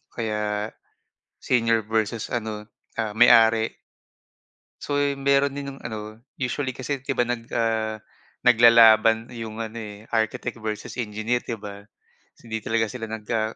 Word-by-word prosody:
Kaya, 105 -2 -2 0.7
senior 115 -2 +2
versus 110 0 -1
ano, 110 -3 -3 0.4
ah, 110 -2 -2
may-ari. 115 -1 +6 1.1
So 145 - -2 0.2
meron 140 0 +2
din 140 -1 -5
yung - - -15
ano, 110 -1 -7 0.2
usually 130 +1 -2
kasi 135 +1 -3
'di 140 - -2
ba 125 - +4
nag 120 -1 -2
ah, 110 -2 0 0.5
nag-lalaban 115 -1 +6
'yong 115 -1 -7
ano 110 +1 -7
eh, 105 -1 -8 0.2
architect 110 +2 -1
versus 110 +1 -5
engineer 110 +3 -2
'di 115 - -4
ba? 100 -1 -9 0.6
Hindi 110 -1 -4
talaga 115 0 +1
sila 115 -3 -6
nagka 110 0 -2
115 Hz, 135 wpm, -24 LUFS, 110-120 Hz, 1.1 s, may-ari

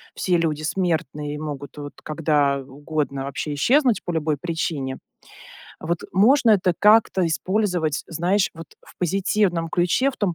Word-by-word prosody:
все 180 - 0
люди 155 -3 0
смертные 155 -4 -2
и - - -5
могут 145 -2 -7
вот 145 -1 -7
когда 150 -3 +1
угодно 140 0 -4
вообще 140 +2 -4
исчезнуть 245 - +2
по - - -8
любой 160 -2 0
причине, 155 -5 -3 0.8
вот 170 +1 -2
можно 235 +6 +5
это 190 -4 +3
как-то 210 -3 +4
использовать, 175 -2 0
знаешь, 180 +4 +1
вот 165 0 -9 0.2
в - - -18
позитивном 185 -1 0
ключе, 180 +11 +1
в 265 - -14
том 195 -5 -1
165 Hz, 145 wpm, -23 LUFS, 150-190 Hz, 0.8 s, можно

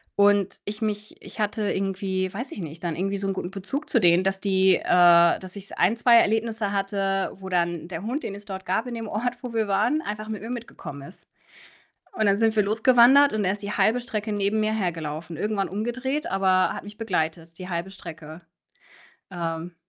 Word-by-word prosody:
und 200 -1 +3
ich 210 +2 -6
mich 210 -1 -3
ich - - -12
hatte 210 0 0
irgendwie, 190 -1 -2
weiß 245 +7 -5
ich - - -7
nicht, 165 -1 -8
dann 170 -2 -2
irgendwie 195 +3 -1
so 195 0 -3
'nen 195 - 0
guten 185 -1 -5
Bezug 200 +11 -5
zu 235 - +3
denen, 175 0 +5
dass 195 0 -1
die 190 -2 +4
äh, 170 -1 +5
dass 185 +1 -10
ich 195 -1 -9
so - - -9
ein, 185 +6 +3
2 235 0 +6
Erlebnisse 220 -1 +1
hatte, 195 -1 -1
wo 190 0 -10
dann 170 -2 -1
der 175 0 -6
Hund, 255 +7 -3
den 200 - -4
es 205 - -11
dort 190 -1 -7
gab 225 - -1
in 240 - -5
dem 225 -1 -5
Ort, 240 +4 -2
wo 245 -2 -6
wir 220 -2 0
waren, 220 +11 +1
einfach 215 -3 -5
mit 215 -3 -4
mir 225 - -7
mitgekommen 220 - -7
ist. 180 - -14 0.9
Und 220 - 0
dann 200 - +4
sind 225 +1 +2
wir 210 - +5
los 215 +3 -2
gewandert 260 +3 +7
und 210 -2 0
er 185 - +2
ist 205 +1 -7
die 200 0 -4
halbe 215 +5 +2
Strecke 220 -3 -4
neben 205 +1 0
mir 215 0 +1
hergelaufen, 165 -4 -3
irgendwann 205 +1 -1
umgedreht, 255 +8 -2
aber 190 -1 +2
hat - - -7
mich 205 +1 -11
begleitet, 165 -6 -2
die 185 0 -7
halbe 170 +2 -3
Strecke. 165 -4 -10 0.9
Ähm. 170 -1 -4
200 Hz, 215 wpm, -25 LUFS, 185-220 Hz, 0.9 s, gewandert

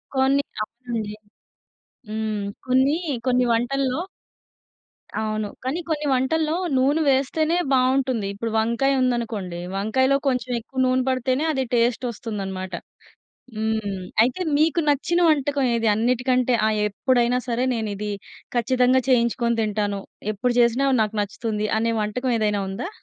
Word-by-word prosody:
కొన్ని 270 +1 +3 0.2
అవునండి. 230 -2 -5 0.9
హ్మ్. 215 -1 -2 0.2
కొన్నీ, 260 +4 +3 0.3
కొన్ని 250 -1 +3
వంటల్లో 260 +4 0 1.2
అవును. 215 -1 -1 0.2
కానీ 270 +7 -2
కొన్ని 300 -1 -1
వంటల్లో 310 +5 +1 0.2
నూనె 285 +5 +3
వేస్తేనే 310 +5 +1 0.2
బావుంటుంది. 255 -4 +2
ఇప్పుడు 225 +3 -4
వంకాయ 235 +5 +2
ఉందనుకోండి. 225 -8 -1 0.2
వంకాయలో 260 +7 +2
కొంచెం 250 -1 0
ఎక్కువ 260 +3 -7
నూనె 255 0 +2
పడితేనే 260 +2 0
అది 265 -3 0
టేస్ట్ 240 +1 +2
వస్తుందనమాట. 195 -5 -5 0.8
హ్మ్. 215 -3 -2 0.2
అయితే 250 +9 0 0.2
మీకు 320 +2 +3
నచ్చిన 290 +5 +2
వంటకం 285 -2 +2
ఏది? 230 -1 0
అన్నిటికంటే, 250 +2 +1
ఆ! - - +3 0.2
ఎప్పుడైనా 245 +3 +1
సరే, 240 +1 0
నేనిది 210 -2 -3 0.4
ఖచ్చితంగా 255 +1 +3
చేయించుకొని 235 -1 +2
తింటాను. 205 -2 -1 0.3
ఎప్పుడు 240 +4 0
చేసినా 240 +3 +3 0.2
నాకు 215 0 -3
నచ్చుతుంది 210 +1 -2
అనే 230 +1 +1
వంటకం 235 +5 -1
ఏదైనా 210 -1 +1
ఉందా? 205 - -4
245 Hz, 120 wpm, -23 LUFS, 220-265 Hz, 1.2 s, కొన్ని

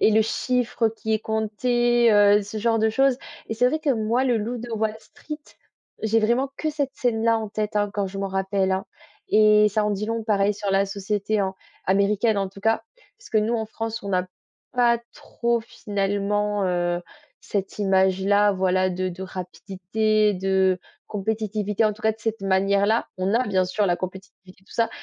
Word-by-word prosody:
et - - +5
et - - +3
le 220 +1 +4
chiffre 235 0 0
qui 220 0 -4
est 215 - +2
compté, 235 +2 +1
heu, 205 0 +6
ce 205 +2 -8
genre 225 +1 +1
de 220 0 +3
choses. 265 +3 +2 0.3
Et 225 - -2
c'est 245 +3 +3
vrai 310 - -1
que 305 -2 0
moi, 230 +2 +1
Le 245 -3 +2
loup 230 +4 -3
de 240 +1 -8
Wall 220 -1 -1
Street, 300 +6 -9 0.6
j'ai 220 +1 +2
vraiment 240 +5 +1
que 310 - -1
cette 285 -3 -2
scène-là 230 -2 +1
en 220 - -4
tête, 210 0 -3
hein, 205 0 +1
quand 200 -1 -1
je 195 +1 -7
m'en 195 0 -2
rappelle, 190 0 0
hein 190 0 -2 0.4
et 210 0 +5
ça 210 +1 0
en 210 - +1
dit 205 +1 -2
long 225 0 -2
pareil 205 -2 +2
sur 205 0 -3
la 195 +1 +3
société, 205 +2 -1
hein, 190 -1 0 0.3
américaine 200 +3 +2
en 195 -1 -1
tout 195 +1 -14
cas. 225 +2 +1 0.4
Parce - - -15
que 220 - +3
nous 215 +3 +1
en 220 -1 -2
France 225 +1 -5
on - - -4
n'a 185 -1 +1 0.5
pas 240 -1 +3
trop 235 0 -1
finalement, 205 -1 -1
heu, 175 -1 0 0.4
cette 195 -1 -4
image-là, 195 +1 +3
voilà 185 0 +1
de 185 +1 -2
de 185 +1 -7
rapidité, 195 +3 -1
de 190 0 +2 0.3
compétitivité. 210 0 -1
En 215 - +3
tout 215 - -15
cas 220 0 +3
de 220 - -18
cette 225 0 -2
manière-là. 200 +3 +2
On 190 +4 0
a 250 +2 +2
bien 185 -2 +2
sûr 190 +3 0
la 175 -2 +2
compétitivité, 185 0 -9
tout - - -17
ça, 230 -1 +1
210 Hz, 195 wpm, -24 LUFS, 195-225 Hz, 0.6 s, heu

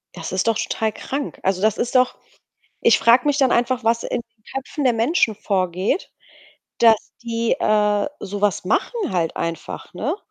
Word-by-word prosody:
Das 165 -1 -6
ist 185 +3 0
doch 225 -1 +2
total 220 -1 -1
krank. 280 +1 -5
Also, 190 -1 0
das 215 +1 +2
ist 245 - -2
doch 255 0 +4 0.7
ich - - +5
frage 240 +3 +5
mich 290 -1 +2
dann 265 -2 +4
einfach, 245 +1 +1
was 230 +1 +1
in 240 - -2
den 230 -2 -39
Köpfen 270 +2 -4
der 250 -3 +4
Menschen 230 +1 +2
vorgeht, 190 - -1 0.7
dass 225 -2 +4
die, 230 -1 -1
äh, 210 -1 +2
so 200 0 -5
was 205 -3 +1
machen 410 - -1
halt 170 -3 -1
einfach, 165 0 -5
ne? 285 - -2
225 Hz, 175 wpm, -21 LUFS, 200-250 Hz, 0.7 s, ich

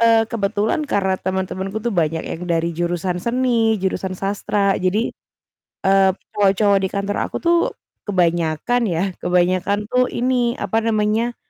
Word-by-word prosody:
Eee, 230 -1 +5
kebetulan 220 +6 -1
karena 190 -6 +1
teman-temanku 190 +2 -3
tuh 235 - 0
banyak 160 -3 0
yang 165 - -6
dari 170 0 0
jurusan 175 +1 -2
seni, 235 0 +1
jurusan 190 -1 -2
sastra, 200 +1 0
jadi, 190 +5 0 0.7
eee, 195 0 +5 0.2
semua 205 -1 +3
cowok 200 -1 +4
di 190 - 0
kantor 200 +1 -2
aku - - -6
tuh 340 0 +4 0.5
kebanyakan 175 +4 +1
ya, 170 -1 0 0.2
kebanyakan 180 +2 +1
tuh 250 +1 +2
ini, 245 -1 0
apa 205 +3 0
namanya, 225 +1 0
200 Hz, 140 wpm, -20 LUFS, 185-225 Hz, 0.7 s, Eee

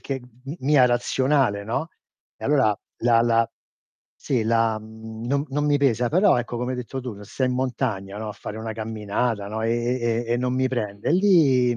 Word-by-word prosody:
che 135 -2 -4
m 125 +3 -11
mia 135 -1 +5
razionale, 120 -3 +1
no, 135 +9 -2 0.5
e - - -10
allora 135 -7 +3 0.3
la 115 -1 +5
la 115 -1 +2 0.6
sì, 125 -5 -1
la 115 -1 +2
mhmm, 110 +1 -9
non 140 +2 0
non 145 +2 -1
mi 145 -1 +3
pesa. 125 -3 +2
Però 185 - +4
ecco, 120 0 -4
come 125 +1 -2
hai 125 - -4
detto 130 +2 -5
tu, 125 -2 -5
ra 100 +1 -11
sei 130 +5 -1
in - - 0
montagna, 120 -6 -2
no, 110 0 -5
a - - -6
fare 105 - -8
una 110 0 -4
camminata, 110 -1 -2
no, 110 +1 -4
e 115 - +1 0.3
e 120 0 0
e 115 - -1
e - - +2
non 125 0 -1
mi 130 0 +2
prende, 105 0 -2
lì, 145 - +4
120 Hz, 205 wpm, -24 LUFS, 110-130 Hz, 0.6 s, mia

